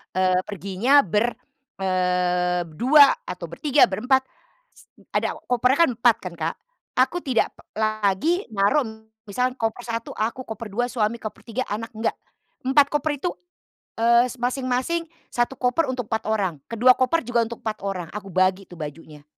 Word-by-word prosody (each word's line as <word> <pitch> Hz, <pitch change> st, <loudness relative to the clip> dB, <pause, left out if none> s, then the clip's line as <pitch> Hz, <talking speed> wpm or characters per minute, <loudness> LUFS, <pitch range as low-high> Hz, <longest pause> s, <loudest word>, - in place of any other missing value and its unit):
eee, 185 Hz, -1 st, +3 dB
perginya 205 Hz, +9 st, +3 dB
ber, 210 Hz, +7 st, 0 dB, 0.4 s
eee, 180 Hz, -1 st, +1 dB
berdua, 265 Hz, -, +6 dB
atau 180 Hz, -1 st, -5 dB
bertiga, 285 Hz, -, +3 dB
berempat. 250 Hz, +7 st, +1 dB, 0.5 s
S -, -, -20 dB, 0.3 s
ada -, -, 0 dB
kopernya 250 Hz, +2 st, +2 dB
kan -, -, -2 dB
4 235 Hz, 0 st, +4 dB
kan 180 Hz, -2 st, -6 dB
Kak, 165 Hz, -1 st, -3 dB, 0.4 s
aku 260 Hz, +7 st, +3 dB
tidak 255 Hz, -6 st, 0 dB, 0.2 s
lagi 215 Hz, -, +1 dB
naruh, 215 Hz, +8 st, +2 dB, 0.5 s
misalnya 250 Hz, +5 st, 0 dB
koper 225 Hz, +2 st, -2 dB
satu 230 Hz, 0 st, -4 dB
aku, 230 Hz, +4 st, -2 dB
koper 220 Hz, +1 st, -6 dB
dua 245 Hz, +3 st, +1 dB
suami, 230 Hz, -1 st, -1 dB
koper 215 Hz, -, -7 dB
tiga 245 Hz, +2 st, -2 dB
anak, 225 Hz, +3 st, -4 dB
enggak. 220 Hz, +1 st, -1 dB, 0.5 s
4 275 Hz, +2 st, +5 dB
koper 295 Hz, -1 st, -1 dB
itu, 355 Hz, -, -1 dB, 0.7 s
eee, 235 Hz, +2 st, +4 dB
s 260 Hz, -, -8 dB
masing-masing 255 Hz, +6 st, -1 dB, 0.2 s
1 240 Hz, +2 st, 0 dB
koper 255 Hz, +5 st, +1 dB
untuk 255 Hz, -2 st, -2 dB
4 220 Hz, -1 st, -3 dB
orang, 190 Hz, -9 st, -1 dB
ke 230 Hz, -, -5 dB
2 255 Hz, +3 st, +7 dB
koper 260 Hz, +4 st, +1 dB
juga 235 Hz, 0 st, +1 dB
untuk 235 Hz, -, -7 dB
4 220 Hz, -1 st, -3 dB
orang, 185 Hz, -4 st, -3 dB
aku 200 Hz, -1 st, -7 dB
bagi 185 Hz, +1 st, +1 dB
tuh 175 Hz, -, -12 dB
bajunya. 150 Hz, -1 st, -9 dB
230 Hz, 160 wpm, -23 LUFS, 190-255 Hz, 0.7 s, 2